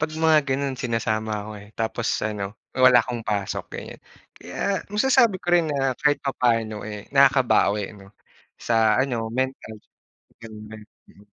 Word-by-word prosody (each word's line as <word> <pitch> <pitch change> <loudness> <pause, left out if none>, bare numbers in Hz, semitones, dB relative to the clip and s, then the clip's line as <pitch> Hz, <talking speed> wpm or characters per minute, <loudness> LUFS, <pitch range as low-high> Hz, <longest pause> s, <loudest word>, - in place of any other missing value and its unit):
pag 155 - 0
mga 160 -1 +4
gano'n 135 -1 -2
sinasama 110 -2 -2
ako, 110 - -9
eh. 100 - -14
Tapos 115 +1 -2 0.2
ano 105 -1 -4 0.2
wala 130 -2 +6
akong 120 -2 -4
pasok 100 -3 -2
ganiyan. - - -9 0.3
Kaya 190 - -3
masasabi 230 0 +3
ko 175 - -2
rin 170 -3 +4
na 135 -3 0
kahit 145 -1 +2
papaano, 115 -5 0
eh, 105 -1 -7
nakakabawi, 130 -7 +3
'no, 100 -2 -15 0.5
sa 110 -2 +2
ano 120 -4 -1
mental 130 -2 -3 0.7
gano'n 110 -2 -10
nga, 110 0 -10 0.3
mm. 100 - -20
120 Hz, 145 wpm, -23 LUFS, 110-140 Hz, 0.7 s, wala